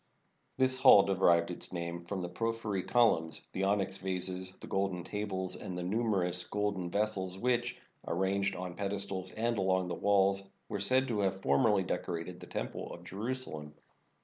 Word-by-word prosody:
This 130 0 +3
hall 130 -7 +9
derived 85 -3 +3
its 85 - -2
name 85 -1 -4
from 90 +2 -4
the - - -2
prophyry 110 +1 -2
col 115 -6 +4
umns, 80 0 -6
the 95 - -1
onyx 100 -1 0
vases, 95 0 -2
the - - -9
golden 95 -2 -1
tables, 95 -2 -3
and 90 - -6
the 90 - -3
numer 100 -1 +1
ous 90 0 0
golden 100 -2 -2
vessels 95 -2 -1
which, 120 +2 0 0.3
arranged 95 +2 0
on 90 -1 -5
pedestals 100 -1 -3
and 115 +1 -1
along 95 -1 +1
the - - -2
walls, 100 -1 +2 0.2
were 105 -3 -3
said 130 +6 +3
to 110 -3 0
have 95 -1 0
formerly 95 +8 +3
decorated 90 -1 -4
the - - -10
Temple - - -4
of 85 - -9
Jerusalem. 95 -7 -4
95 Hz, 170 wpm, -32 LUFS, 90-105 Hz, 0.3 s, hall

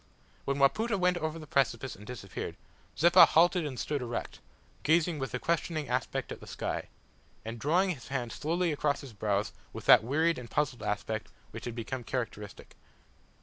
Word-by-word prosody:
When 140 0 0
Wapoota 200 +11 +3
went 180 -1 +2
over 160 -1 -3
the 155 - -8
precipice 135 -3 0
and 105 +2 -13
disappeared, 100 -7 -6 0.4
Zeppa 175 +3 +8
halted 175 0 +4
and 130 -4 -6
stood 145 -3 -2
erect, 120 -1 -4 0.4
gazing 160 0 +2
with 135 - -3
a - - +1
questioning 165 -3 -1
aspect 125 0 -2
at - - -6
the - - -12
sky, - - -3 0.6
and 115 +1 -5
drawing 180 - +2
his 135 -9 -7
hand 125 -4 -3
slowly 170 +6 0
across 145 -1 0
his 135 -4 -10
brows 105 0 -1 0.2
with - - -8
that - - +8
wearied 160 +6 +1
and 120 -2 -9
puzzled 145 -4 0
aspect 105 +1 -2 0.2
which - - -8
had 120 -2 -4
become 120 +2 -4
characteristic. 115 -5 -5
140 Hz, 175 wpm, -30 LUFS, 120-165 Hz, 0.6 s, Zeppa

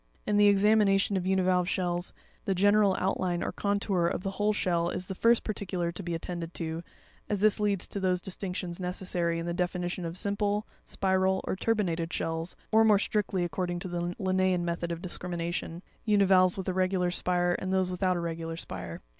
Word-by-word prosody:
In 210 - +1
the 205 0 +6
examination 200 -1 +4
of 185 -1 -1
univalve 185 -1 +2
shells, 175 -2 -1 0.3
the 195 - +1
general 205 +1 +4
outline 185 -2 0
or - - -2
contour 200 -3 0
of 180 - -2
the 195 - -2
whole 205 +2 +1
shell 175 -4 0
is 180 - -4
the 190 - -5
first 230 +5 +3
particular 185 -5 -2
to 175 - -7
be 175 -2 -3
attended 170 0 -5
to, 165 0 -3 0.5
as 205 -2 -1
this 215 0 +4
leads 205 -3 0
to 200 - -3
those 185 -1 +1
distinctions 180 -1 -4
necessary 180 -2 -1
in 165 - -3
the 170 - -2
definition 180 0 -2
of 165 +1 -5
simple, 205 +1 0 0.2
spiral, 190 0 +1
or - - -2
turbinated 180 -6 0
shells, 165 +1 -3 0.2
or 220 0 +6
more 215 -2 +6
strictly, 200 -3 0
accord 175 +1 -2
ing 175 - -2
to 175 - -5
the 175 0 -3
Linnean 185 -2 +1
method 170 0 -2
of 170 0 -5
discrimination, 175 -1 -4 0.2
univalves 195 -4 +4
with 190 - -4
a 185 - 0
regular 185 -1 +1
spire, 175 0 +1
and 190 - -3
those 190 -1 +1
without 185 0 +1
a - - -1
regular 165 -1 -4
spire. 90 - -7
185 Hz, 190 wpm, -29 LUFS, 175-195 Hz, 0.5 s, the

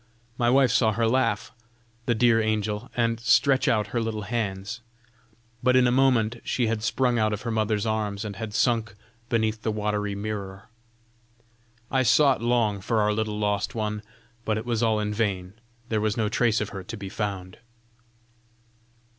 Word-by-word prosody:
My 120 0 +1
wife 130 -1 +4
saw 110 -2 +3
her 115 +2 +1
laugh, 115 -3 0 0.6
the 120 - +2
dear 115 0 +4
angel, 110 +1 -1
and 115 -1 +1
stretch 130 +4 +3
out 105 -2 +1
her 120 - +1
little 110 -2 -3
hands; 105 0 -3 0.8
but 125 +1 +3
in 130 0 +5
a 120 - +3
moment 125 -3 +3
she 125 - 0
had 110 -1 -1
sprung 120 +1 +1
out 110 -1 +1
of 105 - -5
her 120 - -2
mother's 110 -1 0
arms, 110 -1 -2
and 100 -2 -6
had 110 -2 -5
sunk 115 -5 +1 0.3
beneath 110 -1 0
the 110 - -1
watery 105 -1 -2
mirror. 100 0 -6 1.2
I 130 - +3
sought 135 +1 +4
long 115 -4 +1
for 110 +3 0
our 105 0 +2
little 105 -1 -2
lost 105 0 -1
one; 105 -1 -2 0.4
but 110 -1 0
it 110 - -5
was 120 -2 -1
all 110 -2 +2
in 105 0 -2
vain; 100 -4 -2 0.4
there 110 -2 0
was 110 +2 0
no 110 -2 +1
trace 115 0 +2
of 105 - -2
her 95 -2 -7
to 115 - -7
be 100 -1 -7
found." 95 -2 -5
110 Hz, 175 wpm, -25 LUFS, 105-115 Hz, 1.2 s, in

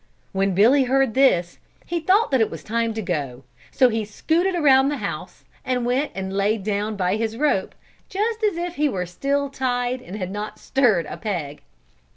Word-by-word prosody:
When 195 -1 0
Billy 255 +8 +5
heard 265 -2 +2
this, 180 -10 +2 0.3
he 345 - -2
thought 380 +6 +2
that 265 -3 +3
it 220 - +2
was - - -8
time 230 +1 -1
to 220 - -3
go, 140 -8 -3 0.3
so 255 - +4
he 225 -1 -1
scooted 330 - 0
around 275 -4 +5
the 290 - -2
house, 180 -6 -6 0.2
and 250 -2 -1
went 255 +5 0
and 190 0 -4
laid 200 +1 +1
down 210 +1 -1
by 185 +1 0
his 225 0 -2
rope, 285 -9 0 0.3
just 440 +3 -2
as 410 -5 +1
if 350 0 -4
he 300 0 +2
were 185 -7 -2
still 280 +11 -1
tied 250 -1 -1
and 205 -6 -9
had 185 -3 -4
not 210 +1 -5
stirred 220 - +2
a - - -7
peg. 170 -10 -4
230 Hz, 190 wpm, -23 LUFS, 195-275 Hz, 0.3 s, Billy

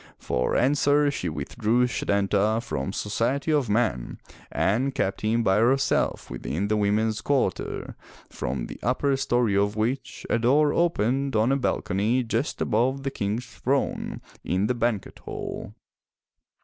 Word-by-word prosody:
For 60 0 -1
answer 145 +2 +3
she 90 -10 -3
withdrew 115 +8 0
Setanta 100 -1 +1
from 70 - -3
society 130 +8 -1
of 140 -7 +1
men 105 - 0 0.3
and 130 +7 +1
kept 95 - -1
him 115 +2 +1
by 95 -2 +3
herself 130 +4 +2
within 95 +8 -3
the 110 - +2
women's 105 +1 +1
quarter, 135 -9 -1 0.3
from 65 0 -4
the - - -9
upper 135 +2 +1
story 120 -5 +1
of 100 +1 +1
which 115 +5 -2
a 115 - +1
door 145 +5 +3
opened 135 -5 +1
on 110 +4 +3
a - - +3
balcony 120 -2 0
just 115 +5 -2
above 130 +5 +1
the 135 - -2
King's 110 +1 -2
throne 130 +4 -2 0.2
in 95 +3 0
the 125 - +1
banquet 120 -4 -2
hall. - - -6
115 Hz, 140 wpm, -25 LUFS, 105-135 Hz, 0.3 s, answer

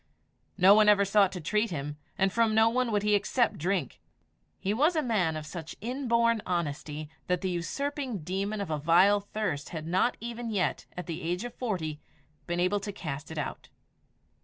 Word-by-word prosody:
No 190 +1 +8
one 210 0 +6
ever 200 -1 +5
sought 200 -1 +4
to 180 - -4
treat 210 +7 0
him, 145 -2 -4 0.2
and 195 0 +2
from 230 -2 +2
no 220 +1 +6
one 250 0 0
would 205 -1 +1
he 210 0 +2
accept 210 0 +1
drink. 175 -4 -1 0.6
He 195 - -1
was 305 +9 +3
a 310 - +1
man 185 - +1
of 155 - -6
such 160 0 -7
inborn 235 -1 +1
honesty, 155 -3 -3 0.2
that 180 -1 0
the 190 - -1
usurping 255 - -3
demon 195 +5 -2
of 195 - -4
a 155 - -1
vile 180 +7 +5
thirst 200 -8 -3
had 155 -2 -6
not 185 +8 +1
even 235 +1 -5
yet, 195 -5 -1
at 180 - -4
the 165 -3 -5
age 175 +4 -2
of 245 - -6
forty, 160 -11 -3 0.5
been 175 0 -1
able 185 +3 +2
to 205 +1 -5
cast 150 -7 -6
it 160 - -7
out. 150 - -5
195 Hz, 190 wpm, -29 LUFS, 170-220 Hz, 0.6 s, No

